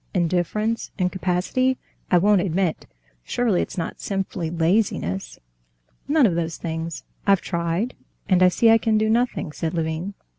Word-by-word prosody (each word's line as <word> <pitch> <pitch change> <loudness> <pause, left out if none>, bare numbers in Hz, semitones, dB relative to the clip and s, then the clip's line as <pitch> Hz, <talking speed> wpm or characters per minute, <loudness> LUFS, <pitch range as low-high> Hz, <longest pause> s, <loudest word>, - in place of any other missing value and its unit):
Indifference, 185 +6 0
incapacity—I 185 +4 0
won't 200 +1 +4
admit; 180 -2 -1 0.4
surely 230 - +1
it's - - -5
not 165 - -4
simply 190 -4 -3
laziness?" 165 - 0 0.7
"None 295 -1 +4
of 195 - +3
those 165 -1 -2
things. 165 0 -4 0.2
I've 195 -3 +5
tried, 170 +8 -1 0.3
and 185 -2 +3
I 185 - +8
see 225 +5 +4
I 225 - +6
can 220 -1 +2
do 215 0 +2
nothing," 235 -8 0
said 160 +2 -3
Levin. 165 +4 -2
185 Hz, 140 wpm, -23 LUFS, 165-215 Hz, 0.7 s, I